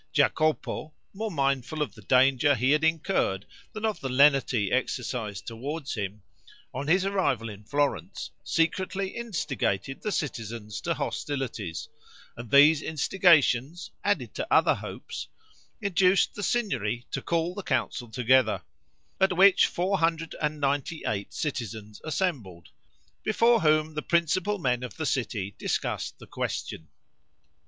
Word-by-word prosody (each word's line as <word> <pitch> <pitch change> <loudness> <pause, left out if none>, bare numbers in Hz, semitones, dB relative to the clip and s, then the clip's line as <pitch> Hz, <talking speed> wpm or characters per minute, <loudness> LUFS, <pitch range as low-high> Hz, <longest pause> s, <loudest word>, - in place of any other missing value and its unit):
Jacopo, 155 0 +1 0.2
more 220 +3 -3
mindful 140 - -1
of - - -6
the - - -14
danger 135 +2 +4
he 130 +3 +2
had 150 +1 +3
incurred 160 - +1 0.3
than 215 0 -4
of 215 -2 -1
the 135 - -4
lenity 130 -5 +4
exercised 125 -5 -2
toward 140 +6 -5
him, 100 -1 -4 0.5
on 140 - -4
his 185 +4 +3
arrival 180 - 0
in 105 0 -10
Florence 140 - -2
secretly 190 +3 0
instigated 140 - -2
the 210 - -2
citizens 115 - -4
to - - -1
hostilities; 115 - -4 0.5
and 120 -1 -9
these 145 +3 +7
instigations, 160 -2 +2
added - - 0
to - - -4
other - - +5
hopes, - - -7 0.5
induced 190 -1 +3
the 205 - -6
Signory 125 - -1
to - - -2
call 170 +1 0
the 200 - -5
Council 120 -9 -2
together, 130 +2 +2 0.6
at 190 -2 +2
which 195 0 +7
498 155 - -1
citizens 110 - -5
assembled, 135 - -3 0.5
before 230 +1 +3
whom 155 0 +3
the 150 - -3
principal 170 +5 +1
men 125 -8 0
of 125 -4 -7
the 160 - -2
city 105 -8 -2
discussed - - -2
the - - -13
question. 80 - -4
145 Hz, 125 wpm, -27 LUFS, 120-175 Hz, 0.6 s, these